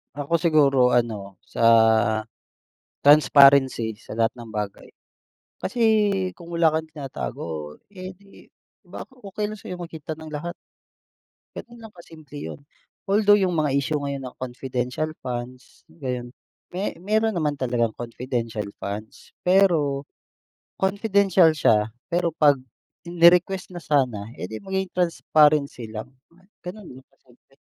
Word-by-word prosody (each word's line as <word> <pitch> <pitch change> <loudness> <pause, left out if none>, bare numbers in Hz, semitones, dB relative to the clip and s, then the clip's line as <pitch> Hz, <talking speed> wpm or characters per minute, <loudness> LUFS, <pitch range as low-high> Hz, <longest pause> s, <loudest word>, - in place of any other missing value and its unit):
Ako, 145 +4 0
siguro 140 -7 +3
ano, 105 -6 -1
sa - - -7 1.4
transparency 140 -6 +5
sa - - -12
lahat 115 +2 0
ng 115 -2 -10
bagay. 105 -2 -5 0.6
Kasi 240 +5 -5 0.6
kung 170 -1 -12
wala 165 -2 +3
kang 160 - 0
tinatago, 80 - -6
eh, 185 -2 -9
di 195 +2 -19 0.3
baka 265 - -10
okey 210 -3 -5
lang 215 - -6
sa'yo 180 -3 -8
makita 160 -3 -8
ng 160 - -9
lahat. 155 +3 -5 1.0
Ganun 240 0 -10
lang 215 - -13
kasimple 155 -4 -13
'yon. - - -7 0.5
Although 205 +1 +4
yung 185 -3 +1
mga 155 -4 +1
issue 145 +2 -1
ngayon 140 -1 -4
ng 125 - -9
confidential 125 +3 -3
funds, 125 +1 -7 0.2
ayun. 125 -2 -4 0.4
Me 185 -2 -3
meron 215 +2 0
naman 150 -3 0
talagang 120 -5 -1
confidential 115 -2 -4 0.2
funds, 105 +2 -7 0.2
pero 170 -7 +3 0.8
confidential 195 -4 +3
siya 110 -7 +2 0.2
pero 170 -2 0
'pag 145 -3 +5 0.5
ini-request 175 +2 +4
na - - -5
sana, 125 -8 0
eh, 90 - -7
di 110 - -6
maging 190 -1 -3
transparency 155 -7 +2
lang, 110 +3 -6 0.6
gano'n 185 +1 -8
lang 130 +1 -13
kasimple 130 0 -27
150 Hz, 125 wpm, -24 LUFS, 125-180 Hz, 1.4 s, transparency